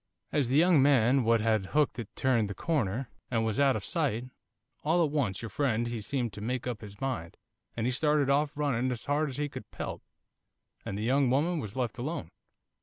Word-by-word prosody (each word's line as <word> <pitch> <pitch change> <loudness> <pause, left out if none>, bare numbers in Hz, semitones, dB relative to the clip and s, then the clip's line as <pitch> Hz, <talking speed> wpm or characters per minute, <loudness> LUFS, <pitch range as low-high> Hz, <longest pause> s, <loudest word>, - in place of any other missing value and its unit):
'As 140 -5 +1
the 135 - +3
young 170 -2 +6
man 130 -1 +4
what 115 0 +3
had 110 -3 +1
hooked 150 -4 +2
it 115 - -5
turned 120 -6 +2
the 100 - -5
corner, 130 - -1 0.2
and 115 -2 +1
was 110 +1 -1
out 140 -2 +4
of - - -4
sight, 130 -8 0 0.6
all 165 +2 +3
at 145 - -3
once 120 -10 -1
your 115 - -4
friend 120 0 0
he 120 -2 -3
seemed 120 0 -2
to 105 - -8
make 125 +3 -2
up 120 -3 -3
his 100 -1 -10
mind, 125 -12 -3 0.4
and 115 - -1
he 125 - +2
started 150 +2 +2
off 145 +1 +1
running 130 -4 0
as 120 - -5
hard 150 +1 +1
as 130 - -6
he 145 0 0
could - - -9
pelt, - - -5 0.8
and 100 - -4
the 105 - -3
young 130 +2 +3
woman 155 +6 +2
was 105 -7 -6
left 125 -2 -2
alone. 135 - -4
130 Hz, 215 wpm, -30 LUFS, 110-145 Hz, 0.8 s, young